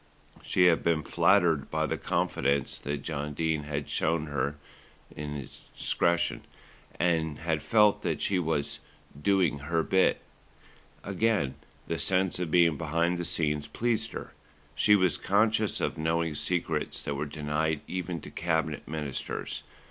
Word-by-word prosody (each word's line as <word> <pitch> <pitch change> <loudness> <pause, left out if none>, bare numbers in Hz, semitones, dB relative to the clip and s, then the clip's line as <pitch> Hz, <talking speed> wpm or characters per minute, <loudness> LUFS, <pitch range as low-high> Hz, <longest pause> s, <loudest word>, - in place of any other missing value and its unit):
She 90 - +2
had 85 -2 +5
been 80 -2 +2
flattered 85 -7 +3
by - - 0
the - - -1
confidence 70 0 0
that 70 0 -4
John 75 -2 -4
Dene 80 -2 0
had 75 -1 -3
shown 80 -1 0
hi 75 - -9
her 70 +1 -1 1.2
discretion, 85 0 +1 0.6
and 80 -3 +1
had 80 -2 -1
felt 105 -2 +4
that - - -1
she 95 -2 +1
was 80 -4 -1 0.4
"doing 90 -5 +2
her 80 +3 0
bit." 95 +3 +3 0.8
Again, 100 -8 +1 0.3
the 85 - -3
sense 95 +4 +2
of 90 -3 -2
being 85 -2 +4
behind 85 +2 0
the - - -1
scenes 75 -4 0
pleased 115 -1 -1
her. - - -7 0.4
She 105 - +5
was 95 -6 +2
conscious 105 0 +2
of - - -2
knowing 80 0 0
secrets 80 0 -2
that 70 - -2
were 70 +1 -3
denied 75 +1 -1
even 90 -3 -4
to - - -10
Cabinet 80 -2 -1
Ministers. 75 -3 -4
80 Hz, 140 wpm, -29 LUFS, 75-90 Hz, 1.2 s, had